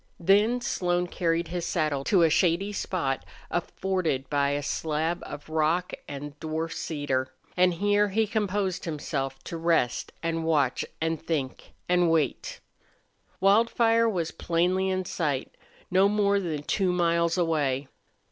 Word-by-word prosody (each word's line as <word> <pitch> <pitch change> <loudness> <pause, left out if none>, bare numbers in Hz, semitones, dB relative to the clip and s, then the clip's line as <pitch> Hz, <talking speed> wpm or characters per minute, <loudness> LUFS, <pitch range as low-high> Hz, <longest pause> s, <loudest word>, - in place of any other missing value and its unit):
Then 210 +7 +3
Slone 180 -6 0
carried 170 -1 -1
his 175 0 -3
saddle 155 -5 0
to 185 -5 +4
a 165 - +5
shady 185 +5 +2
spot 140 -10 -2 0.3
afforded 175 -6 -1
by 140 -1 +2
a 145 0 -1
slab 160 +3 -1
of 145 0 -8
rock 160 +3 0
and 145 +1 -6
a - - -25
dwarf 160 +1 -2
cedar, 135 -4 -2 0.2
and 180 -1 +3
here 205 +3 +2
he 220 +3 +2
composed 205 -3 -1
himself 140 -4 -3
to 170 - -5
rest 165 -7 +1
and 165 0 -1
watch 150 -6 +1 0.2
and 160 0 -1
think 140 -6 -3
and 180 -1 +3
wait. 160 -5 0 0.8
Wildfire 230 +3 +4
was 170 -6 -2
plainly 180 +3 0
in 185 0 -1
sight 145 -7 -2 0.4
no 190 +2 +5
more 200 -1 +2
than 160 -6 -3
two 190 +3 +1
miles 170 -1 +2
away. 145 -6 0
170 Hz, 140 wpm, -27 LUFS, 150-190 Hz, 0.8 s, a